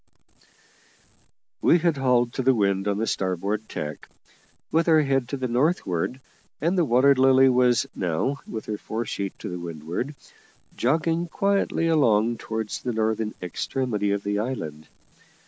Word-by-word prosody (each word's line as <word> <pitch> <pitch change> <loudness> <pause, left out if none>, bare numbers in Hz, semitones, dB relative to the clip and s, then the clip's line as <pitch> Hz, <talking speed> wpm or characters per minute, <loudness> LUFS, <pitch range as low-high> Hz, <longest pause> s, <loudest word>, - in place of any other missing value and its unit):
We - - +5
had 170 -3 +1
hauled 125 -3 +2
to - - -2
the 130 0 +3
wind 100 -2 +1
on 100 -1 0
the 110 - 0
starboard 100 +3 -2
tack, 75 -1 -6 0.6
with 165 +1 +2
our 160 -1 +6
head 135 -3 0
to 140 - -3
the 130 -1 -2
northward, 125 - 0 0.4
and 170 +5 +1
the 175 -3 +3
Water 130 +2 +5
Lily 130 0 +5
was 125 -1 +3
now, 90 - -1
with 110 - -6
her 105 -1 -4
fore 115 +2 -4
sheet 100 -1 -4
to 90 0 -6
windward, 85 - -5 0.6
jogging 165 +6 +1
quietly 195 -1 0
along 120 -8 +3
towards 110 -1 -4
the 125 - -2
northern 110 -1 -1
extremity 105 +3 -2
of 100 0 -1
the 100 0 -1
island. 80 - -4
120 Hz, 145 wpm, -25 LUFS, 100-135 Hz, 0.6 s, our